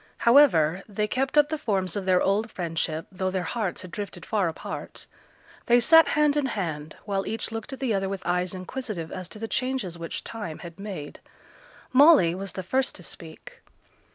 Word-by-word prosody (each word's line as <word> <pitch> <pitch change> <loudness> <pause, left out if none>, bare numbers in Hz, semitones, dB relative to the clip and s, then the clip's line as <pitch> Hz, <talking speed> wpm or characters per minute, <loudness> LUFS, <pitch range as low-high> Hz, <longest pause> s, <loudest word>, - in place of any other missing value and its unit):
However, 195 - +5
they 210 +1 -1
kept 265 +6 -1
up 295 0 +6
the 315 -1 -2
forms 190 - -1
of 195 -2 -3
their 185 -1 +4
old 210 +4 +1
friendship, 165 -2 -3
though 185 0 -2
their 185 -1 -2
hearts 190 0 -3
had 185 - -10
drifted 205 -2 -6
far 205 -5 +1
apart. 160 - -6 0.6
They 240 +1 +6
sat 325 +4 +7
hand 300 -1 +4
in 290 -2 +1
hand 160 - -4
while 195 -1 -2
each 225 0 -3
looked 225 +5 -5
at 270 - -5
the 260 -5 0
other 195 -1 0
with 195 -1 -5
eyes 180 +1 0
inquisitive 185 -3 -5
as 185 -1 -6
to - - -8
the 225 +1 -4
changes 255 -10 -2
which 165 - -5
time 210 -9 -6
had 170 +2 -10
made. 190 -8 -7 0.7
Molly 275 - +7
was 195 +1 -5
the 190 - -5
first 260 +8 0
to 180 - -9
speak. 160 -1 -10
195 Hz, 190 wpm, -26 LUFS, 180-240 Hz, 0.7 s, sat